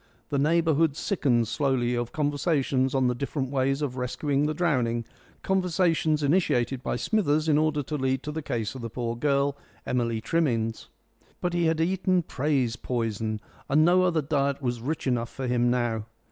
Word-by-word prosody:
The 140 - 0
neighbourhood 160 0 +2
sickened 125 - +1
slowly 125 0 0
of 120 -1 -2
conversations 145 -3 0
on 130 -1 +2
the 125 - +2
different 135 +1 -3
ways 135 +1 +1
of 130 -3 -3
rescuing 135 +3 0
the 155 - -1
drowning 125 -9 0 0.4
conversations 170 -5 +1
initiated 135 -5 +1
by - - -2
Smithers 155 - +1
in 150 -1 +4
order 155 -2 +1
to 150 +3 -3
lead 130 -1 0
to 150 - -4
the 160 +1 -4
case 115 -7 -3
of 130 - -8
the 115 - -4
poor 115 0 -3
girl, 140 +2 +1 0.3
Emily 115 -2 0
Trimmins. 115 -5 -1 0.5
But 175 -1 -1
he 175 -1 +1
had 160 0 +1
eaten 185 +1 +1
praise 135 -5 0
poison, 110 -3 -2 0.3
and 155 +3 +4
no 180 +2 +5
other 170 -4 +2
diet 140 -1 0
was 120 -4 -2
rich 150 +6 -3
enough 120 -3 0
for 135 - -6
him 120 -1 +2
now. 120 -3 0
140 Hz, 175 wpm, -26 LUFS, 120-155 Hz, 0.5 s, no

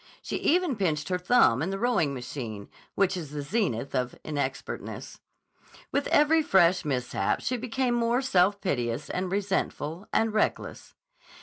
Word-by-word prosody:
She - - -3
even 345 -6 +1
pinched 160 -5 -1
her 180 -1 0
thumb 180 - +4
in 170 - -1
the 195 - -2
rowing 215 -10 +1
machine, 125 -5 -6 0.3
which 195 -1 +2
is 165 -5 -5
the 145 0 -5
zenith 140 - -1
of 125 -2 -1
inexpertness. 140 -3 -5 0.7
With 280 - 0
every 310 +2 +4
fresh 185 - +4
mishap 125 -8 -1
she 255 - -1
became 250 +1 -1
more 240 +2 +1
self 200 -4 +3
piteous 120 - -2
and 185 0 -2
resentful 190 -3 -2
and 225 -1 +1
reckless. 215 - -2
185 Hz, 145 wpm, -27 LUFS, 140-230 Hz, 0.7 s, thumb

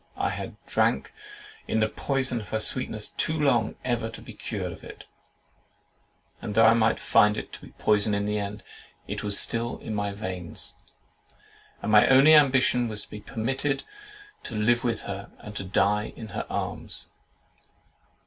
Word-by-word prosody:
I - - 0
had - - -6
drank - - +1 0.5
in 110 - +1
the 110 - +3
poison 130 0 -1
of 105 - -11
her 110 - 0
sweetness 110 -1 +1
too 160 0 -1
long 125 -7 +2
ever 120 -3 -1
to 115 - -10
be - - -11
cured - - -4
of - - -11
it; - - -10 1.4
and 105 - -5
though 115 0 +6
I 110 - +7
might 110 -1 +2
find 105 0 +4
it - - -6
to - - -9
be - - -14
poison 105 0 +2
in 100 0 -1
the 105 0 0
end, 100 0 -5 0.4
it - - -4
was 100 -1 +2
still 115 +1 +1
in 110 - -6
my 100 -1 -1
veins. 95 -4 -6 1.1
My 105 -1 +5
only 135 +4 +7
ambition 130 -4 +5
was 105 -2 -4
to - - -17
be 105 - -8
permitted 135 +5 -2 0.6
to 115 - -6
live 120 +3 +2
with 115 -3 -1
her, 100 0 -6
and 105 0 -10
to 100 - -3
die 100 +2 +1
in 110 -2 -8
her 90 - -5
arms. - - -4
110 Hz, 170 wpm, -26 LUFS, 105-120 Hz, 1.4 s, I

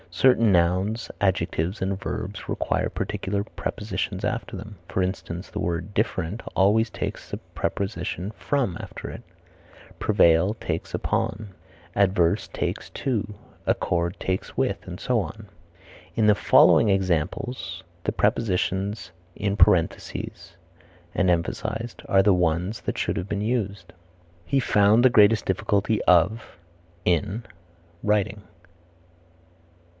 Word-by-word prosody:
Certain 115 +4 +4
nouns, 95 +6 +1
adjectives 95 -1 0
and 95 0 0
verbs - - -5
require - - 0
particular 100 +1 -2
prepositions 110 0 -4
after - - -3
them, 105 +1 -9
for 95 - 0
instance, 90 -1 -4
the - - -5
word 85 +4 -2
different 100 -1 -1
always 110 +4 +4
takes - - -5
the - - -4
preposition 95 -1 -3
from 120 -4 -1
after - - -8
it; - - -8 0.8
prevail 95 -1 +4
takes - - -4
upon; 110 -1 -1 0.5
averse 95 -4 +2
takes - - -3
to; 105 -6 -2 0.3
accord 85 +2 0
takes 95 0 -3
with, - - 0
and 90 0 -7
so 125 -3 +1
on. 110 +1 -8 0.7
In 110 - +3
the 105 -1 +6
following 105 - +6
examples 95 +6 -1 0.2
the - - 0
prepositions 100 0 0 0.2
in 100 -1 -1
parentheses 85 -1 +1 0.6
are 100 +3 0
the 100 - +5
ones 90 +4 0
that - - -3
should - - -1
have 90 +3 -4
been 100 - -1
used: 100 -6 -2 0.5
"He 135 +10 +2
found 110 0 +4
the 130 - +6
greatest 110 0 +5
difficulty 100 +3 +1
of 95 +5 +3 0.5
(in) 100 +6 +1 0.6
writing." 105 0 +1
100 Hz, 115 wpm, -25 LUFS, 90-110 Hz, 0.8 s, the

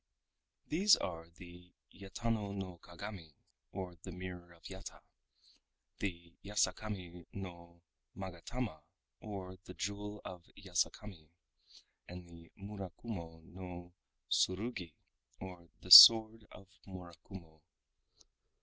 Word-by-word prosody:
These 195 +6 +5
are 85 -1 -6
the 90 +1 -15 0.2
Yatano 100 +1 -4
no 95 -3 -7
Kagami 85 -3 -10 0.4
or 90 -3 -7
the 95 - -9
Mirror 90 -1 -9
of 85 - -23
Yata, 95 +1 -10 1.0
the 85 -3 -5
Yasakami 95 -3 -3
no 85 -3 -10 0.3
Magatama 95 +1 -6 0.4
or 95 -3 -8
the 90 - -11
Jewel 105 +1 -5
of 90 -2 -9
Yasakami, 90 -2 -3 0.8
and 90 0 -10
the 85 -1 -16
Murakumo 95 -4 -8
no 90 0 -10 0.3
Tsurugi 95 -4 -1 0.4
or 90 -3 -10
the 90 - -11
Sword 110 +1 +11
of 95 - -14 0.2
Murakumo. 85 -3 -12
90 Hz, 95 wpm, -34 LUFS, 85-100 Hz, 1.0 s, Sword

